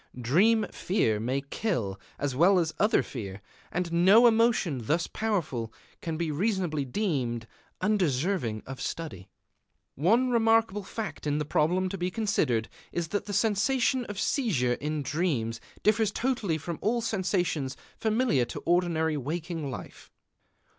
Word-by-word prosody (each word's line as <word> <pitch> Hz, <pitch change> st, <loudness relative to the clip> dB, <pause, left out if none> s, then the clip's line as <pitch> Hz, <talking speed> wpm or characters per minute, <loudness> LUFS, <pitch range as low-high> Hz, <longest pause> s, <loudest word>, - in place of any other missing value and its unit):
Dream 195 Hz, -, +3 dB
fear 115 Hz, -, 0 dB
may 130 Hz, +5 st, -1 dB
kill 135 Hz, -, -2 dB, 0.2 s
as 140 Hz, -3 st, -2 dB
well 180 Hz, +7 st, +5 dB
as 165 Hz, -3 st, +1 dB
other 210 Hz, +2 st, +3 dB
fear; 100 Hz, -6 st, -6 dB, 0.3 s
and 175 Hz, -1 st, -2 dB
no 190 Hz, +8 st, +6 dB
emotion 220 Hz, -, +3 dB
thus 165 Hz, +2 st, +2 dB
powerful 165 Hz, -, -2 dB, 0.3 s
can 165 Hz, -1 st, -3 dB
be 165 Hz, -2 st, -1 dB
reasonably 175 Hz, -3 st, 0 dB
deemed 130 Hz, -, -1 dB, 0.4 s
undeserving 175 Hz, -, 0 dB
of 135 Hz, 0 st, -7 dB
study. 105 Hz, -, -5 dB, 0.6 s
One 230 Hz, -, +3 dB
remarkable 225 Hz, -3 st, +3 dB
fact 210 Hz, -5 st, -5 dB
in 145 Hz, 0 st, +1 dB
the 150 Hz, -, -1 dB
problem 175 Hz, +6 st, +1 dB
to 195 Hz, 0 st, -5 dB
be 180 Hz, +1 st, 0 dB
considered 160 Hz, -, 0 dB, 0.2 s
is 170 Hz, -2 st, -2 dB
that 205 Hz, +3 st, -2 dB
the 205 Hz, -, -5 dB
sensation 235 Hz, +5 st, +2 dB
of 205 Hz, -2 st, -6 dB
seizure 165 Hz, -, +1 dB
in 150 Hz, +3 st, -3 dB
dreams 130 Hz, -7 st, -1 dB, 0.2 s
differs 215 Hz, 0 st, +3 dB
totally 225 Hz, -9 st, 0 dB
from 160 Hz, +2 st, -5 dB
all 235 Hz, +2 st, +1 dB
sensations 180 Hz, -, -1 dB, 0.2 s
familiar 220 Hz, -, +1 dB
to -, -, -6 dB
ordinary 165 Hz, -3 st, +1 dB
waking 160 Hz, +2 st, -3 dB
life. 130 Hz, -, -9 dB
170 Hz, 140 wpm, -28 LUFS, 140-210 Hz, 0.6 s, no